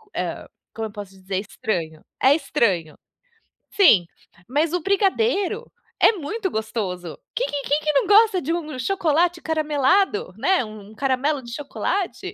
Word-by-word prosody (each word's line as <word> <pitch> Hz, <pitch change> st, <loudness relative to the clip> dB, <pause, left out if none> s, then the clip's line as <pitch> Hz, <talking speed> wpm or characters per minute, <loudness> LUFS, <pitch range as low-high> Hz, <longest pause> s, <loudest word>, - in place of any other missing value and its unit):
eh, -, -, -4 dB, 0.3 s
como 225 Hz, -1 st, -4 dB
eu -, -, -12 dB
posso 205 Hz, -2 st, -8 dB
dizer, 190 Hz, 0 st, -5 dB
estranho, 180 Hz, -7 st, -4 dB, 0.2 s
é 270 Hz, +2 st, +6 dB
estranho. 195 Hz, -, 0 dB, 0.7 s
Sim, 225 Hz, -, +6 dB, 0.4 s
mas 300 Hz, +6 st, 0 dB
o 355 Hz, -, 0 dB
brigadeiro 400 Hz, +3 st, +1 dB, 0.3 s
é -, -, +7 dB
muito 380 Hz, +4 st, -4 dB
gostoso. 200 Hz, -6 st, -4 dB, 0.2 s
Quem -, -, 0 dB
que 285 Hz, -1 st, -3 dB
quem 290 Hz, +2 st, +1 dB
que 300 Hz, -1 st, 0 dB
não 275 Hz, -, +3 dB
gosta 415 Hz, -2 st, +5 dB
de 325 Hz, +5 st, -1 dB
um 310 Hz, -5 st, -4 dB
chocolate 340 Hz, +1 st, +1 dB
caramelado, 320 Hz, -, +1 dB
né, 375 Hz, -8 st, +2 dB
um 215 Hz, 0 st, -11 dB
caramelo 270 Hz, +3 st, 0 dB
de 235 Hz, 0 st, -9 dB
chocolate. 370 Hz, +6 st, -3 dB
295 Hz, 145 wpm, -23 LUFS, -, 0.7 s, é